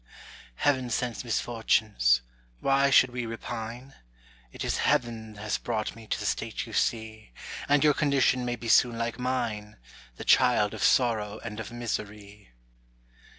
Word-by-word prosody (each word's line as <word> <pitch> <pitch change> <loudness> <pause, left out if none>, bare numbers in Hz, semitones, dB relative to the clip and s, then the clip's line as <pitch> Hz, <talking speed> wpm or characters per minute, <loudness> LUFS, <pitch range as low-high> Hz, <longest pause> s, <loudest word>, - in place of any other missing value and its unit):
Heaven 130 - +1
sends 120 +1 -2
misfortunes, 110 - +1 0.4
why 140 0 +3
should 130 -2 +5
we 125 -1 -4
repine? 115 +3 -6 0.6
'T - - -6
is - - 0
Heaven 110 -3 0
has 105 0 -3
brought 110 -3 -3
me 115 -1 -13
to - - -2
the - - -5
state - - -2
you - - -11
see: 110 - -2 0.4
And 145 0 +4
your 150 -1 +5
condition 140 -3 +2
may 120 0 -2
be 120 0 -8
soon 120 +1 +4
like 115 +1 -3
mine, 110 -5 -3 0.4
The - - -8
child 120 -5 +4
of - - -7
sorrow 110 -4 +2
and 110 -2 -6
of 110 -2 -6
misery. 105 -3 -6
115 Hz, 150 wpm, -27 LUFS, 110-125 Hz, 0.6 s, should